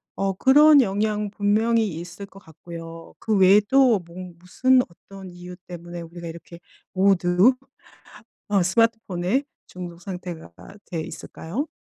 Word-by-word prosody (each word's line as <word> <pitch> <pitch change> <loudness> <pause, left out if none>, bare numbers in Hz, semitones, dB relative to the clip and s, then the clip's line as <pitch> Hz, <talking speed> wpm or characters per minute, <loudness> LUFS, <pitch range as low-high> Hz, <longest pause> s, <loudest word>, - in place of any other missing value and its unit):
어 195 0 -1
그런 290 +7 +6
영향 210 0 -1
분명히 215 +2 +1
있을 175 +3 -9
것 195 0 -16
같고요. 165 0 -11
그 220 -2 -1
외에도 210 +5 +5
뭔 175 0 -11
무슨 255 +8 +2
어떤 190 +2 -13
이유 180 0 -10
때문에 175 -1 -8
우리가 170 +1 -9
이렇게 170 +1 -10 0.3
모두 190 +3 +4 1.0
어 200 -3 +2
스마트폰에 225 +2 0 0.2
중독 175 -1 -9
상태가 180 - -8 0.3
돼 165 -3 -4
있을까요? 205 - -6
190 Hz, 265 characters per minute, -23 LUFS, 175-215 Hz, 1.0 s, 그런